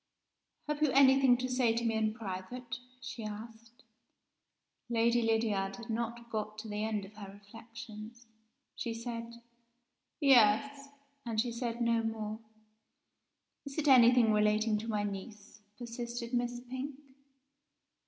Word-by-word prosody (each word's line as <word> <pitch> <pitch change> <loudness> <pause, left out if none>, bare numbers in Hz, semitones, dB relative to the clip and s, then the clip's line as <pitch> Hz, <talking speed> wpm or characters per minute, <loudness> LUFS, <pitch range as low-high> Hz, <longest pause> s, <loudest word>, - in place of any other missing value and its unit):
"Have 300 0 -2
you 305 - +4
anything 270 -2 +6
to 255 +1 -2
say 250 -3 +2
to 235 0 -1
me 225 - +2
in 220 -1 0
private?" 225 +4 -6 0.2
she 245 -2 -7
asked. 225 +4 -9 1.1
Lady 235 0 +3
Lydiard 220 -4 +1
had 230 +1 -7
not 235 +1 -3
got 215 -1 -3
to 220 +1 -7
the 210 0 -3
end 215 -2 -1
of 195 - -14
her 200 -2 -8
reflections. 225 +2 -11 0.5
She 230 -1 -3
said 230 0 -6 0.8
"Yes!" 275 +1 +4 0.3
and 230 -2 -2
she 240 +2 +1
said 235 0 -3
no 230 -1 +3
more. 220 -1 -3 1.2
"Is 280 0 -8
it 310 -1 0
anything 240 -3 +7
relating 210 +1 +2
to 220 - -7
my 210 -2 0
niece?" 205 +1 -7 0.2
persisted 235 0 -6
Miss 245 0 0
Pink. 260 +3 -6
230 Hz, 135 wpm, -32 LUFS, 215-245 Hz, 1.2 s, anything